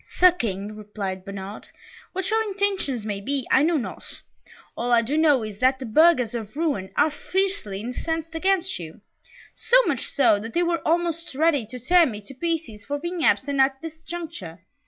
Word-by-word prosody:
"Sir 365 0 +5
King," 210 - -4
replied 200 -3 -5
Bernard, 200 +1 -8 0.5
"what 380 0 -2
your 445 0 +3
intentions 390 - -1
may 205 -2 -3
be, 270 +3 -1
I 265 - +6
know 325 +2 +3
not. 255 - -7 0.5
All 245 +1 -2
I 235 -1 +5
do 265 +6 -2
know 300 -6 +4
is, 210 -2 -7
that 260 +1 +3
the 260 - -6
burghers 255 -1 +4
of 225 0 -6
Rouen 285 - -1
are 310 - +4
fiercely 370 - -2
incensed 320 +7 -4
against 375 - 0
you 165 +2 -9 0.5
so - - +3
much - - -1
so, 240 -7 +3
that 225 +2 -8
they 350 - +3
were 340 -1 0
almost 335 -2 0
ready 290 -6 +2
to 250 - -7
tear 335 +8 +4
me 215 -5 -5
to 205 +7 -11
pieces 305 -8 -3
for 285 +6 -3
being 345 +2 -4
absent 280 -3 +2
at 270 0 +3
this 320 -1 -7
juncture. 320 - -7
280 Hz, 185 wpm, -24 LUFS, 215-335 Hz, 0.5 s, I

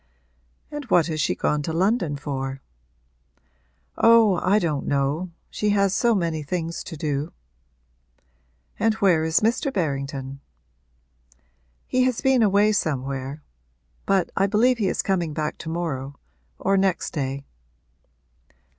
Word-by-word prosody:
'And 295 -1 -5
what 175 -8 +3
has 155 -2 -2
she - - +1
gone 150 - 0
to 155 - -3
London 175 -2 +1
for?' 135 -2 -4 1.4
'Oh, 225 -4 +6
I 195 +3 +3
don't 155 -8 -1
know 140 +6 0 0.2
she 210 - -1
has 200 -1 +2
so 235 +1 +2
many 165 -4 -1
things 165 +2 -4
to 160 - -7
do.' 145 +1 -2 1.5
'And 225 -1 +2
where 180 -7 +3
is 160 0 +2
Mr. 240 +6 +1
Berrington?' 140 - -3 1.5
'He 255 - +1
has 255 -3 0
been 265 -2 +3
away 205 0 +4
somewhere; 140 -5 -2 0.6
but 190 -3 +2
I 195 - +2
believe 235 +5 +3
he 205 - +1
is - - -1
coming 175 -5 0
back 150 -1 -3
to 160 - -6
morrow 145 -5 -4 0.4
or 195 +1 +1
next 190 -3 0
day.' 140 -1 -3
170 Hz, 130 wpm, -24 LUFS, 145-205 Hz, 1.5 s, Oh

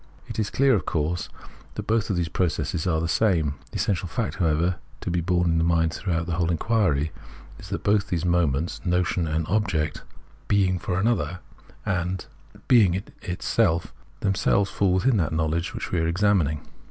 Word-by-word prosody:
It - - -6
is 105 -2 0
clear, 135 0 +3
of 105 - 0
course, 80 +3 -1 0.5
that - - -4
both 115 0 +1
of 100 - +1
these 85 -1 0
processes 85 0 -1
are 80 -3 +2
the 85 - -1
same. 85 -4 +2 0.2
The - - -14
essential 95 -2 0
fact, 110 +6 -3
however, 85 +1 +1 0.2
to - - -3
be 85 0 +1
borne 90 0 +1
in 80 0 +2
mind 85 -1 +2
throughout 85 -4 -1
the 85 - -4
whole 85 -2 +1
inquiry 80 -5 +1 0.5
is 95 - -10
that 100 - -4
both 105 -1 +2
these 90 -2 -1
moments, 85 -3 +1
notion 90 -1 +1
and 80 +1 -1
object, 90 -6 0 0.2
" - - -29
being 95 -2 +2
for 90 0 -2
another 90 -6 0 0.3
" - - -25
and 90 +1 -3 0.2
" - - -21
being 105 -8 +5
in 95 - -2 0.2
itself," 90 -1 0 0.3
themselves 95 0 +2
fall 95 -2 +2
within 115 +5 +3
that 80 -5 0
knowledge 80 +2 0
which - - -5
we 90 - +1
are 80 - +1
examining. 85 -5 +1
90 Hz, 190 wpm, -25 LUFS, 80-100 Hz, 0.5 s, being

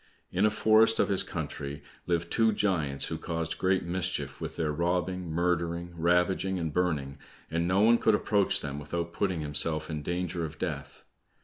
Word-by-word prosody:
In 95 +4 +3
a - - +3
forest 110 +1 +4
of - - +3
his 95 -2 +3
country 75 -2 -5 0.2
lived 85 -1 -1
two 115 -1 +3
giants 80 -10 0
who - - -4
caused 80 -1 -3
great 95 0 +2
mischief 85 -6 -3
with - - -5
their 80 -2 -1
robbing, 90 +2 -1
murdering, 85 +1 -1
ravaging, 90 +3 +1
and 80 -4 -3
burning, 75 -6 -1 0.3
and 85 +1 0
no 95 +2 +3
one 115 +2 +5
could 110 - +4
approach 105 -1 +2
them 70 -1 -5
without 85 +3 -4
putting 95 -4 -1
himself 75 +2 +2
in 75 -1 -3
danger 85 +1 -2
of 80 -1 -6
death. - - -5
85 Hz, 175 wpm, -29 LUFS, 80-95 Hz, 0.3 s, one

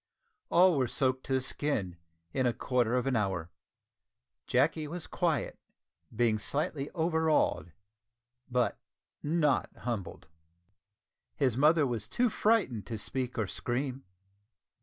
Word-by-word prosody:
All 175 -3 +5
were 130 - +2
soaked 130 0 0
to 135 - -1
the 130 - +2
skin 125 -9 -1 0.4
in 130 -2 +2
a 120 - +1
quarter 125 -1 +1
of 125 - +1
an 135 -2 +1
hour. 95 -5 -1 1.0
Jacky 150 +4 +2
was 170 +2 -5
quiet 165 -7 -1 0.6
being 110 -1 +2
slightly 140 +3 -2
overawed, 160 - +1 0.8
but 125 -1 0 0.4
not 150 -4 +1
humbled! 115 -6 -5 1.1
His 130 -5 +1
mother 150 +3 +4
was 115 -5 -3
too 240 - +1
frightened 205 - +1
to 115 - -4
speak 125 +4 -3
or 110 - +1
scream. 130 +7 -3
130 Hz, 120 wpm, -31 LUFS, 120-155 Hz, 1.1 s, All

